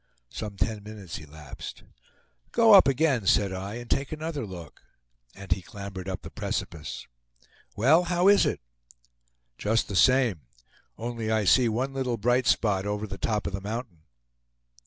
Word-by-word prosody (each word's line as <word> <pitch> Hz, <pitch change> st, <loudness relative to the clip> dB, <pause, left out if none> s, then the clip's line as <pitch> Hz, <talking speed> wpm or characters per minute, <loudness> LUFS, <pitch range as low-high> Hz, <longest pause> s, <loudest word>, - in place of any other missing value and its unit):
Some 105 Hz, -2 st, -6 dB
ten 110 Hz, 0 st, -1 dB
minutes 100 Hz, -4 st, -8 dB
elapsed. 75 Hz, -2 st, -10 dB, 0.7 s
"Go 230 Hz, -2 st, +6 dB
up 195 Hz, -, +9 dB
again," 135 Hz, -6 st, +1 dB
said 100 Hz, -1 st, +3 dB
I, 95 Hz, +3 st, -5 dB
"and 120 Hz, 0 st, -7 dB
take 135 Hz, +3 st, -1 dB
another 155 Hz, -5 st, -4 dB
look;" 85 Hz, -5 st, -10 dB, 0.5 s
and 100 Hz, 0 st, -11 dB
he 95 Hz, -, +1 dB
clambered 100 Hz, -2 st, -8 dB
up 95 Hz, -, -5 dB
the -, -, -9 dB
precipice. 80 Hz, -3 st, -5 dB, 0.7 s
"Well, 155 Hz, +11 st, +4 dB
how 175 Hz, +1 st, +2 dB
is 205 Hz, 0 st, +6 dB
it?" -, -, -2 dB, 1.0 s
"Just 110 Hz, +2 st, +1 dB
the 100 Hz, -, -4 dB
same, 125 Hz, -, +4 dB, 0.6 s
only 115 Hz, -1 st, -4 dB
I 110 Hz, -1 st, +2 dB
see 120 Hz, +5 st, +5 dB
one 130 Hz, +5 st, -2 dB
little 130 Hz, -3 st, -1 dB
bright 120 Hz, +2 st, +1 dB
spot 100 Hz, -4 st, +2 dB
over 105 Hz, +1 st, -2 dB
the 105 Hz, -, -8 dB
top 105 Hz, -2 st, -1 dB
of -, -, -3 dB
the 95 Hz, -, -3 dB
mountain." 105 Hz, -4 st, -6 dB
110 Hz, 155 wpm, -27 LUFS, 95-130 Hz, 1.0 s, up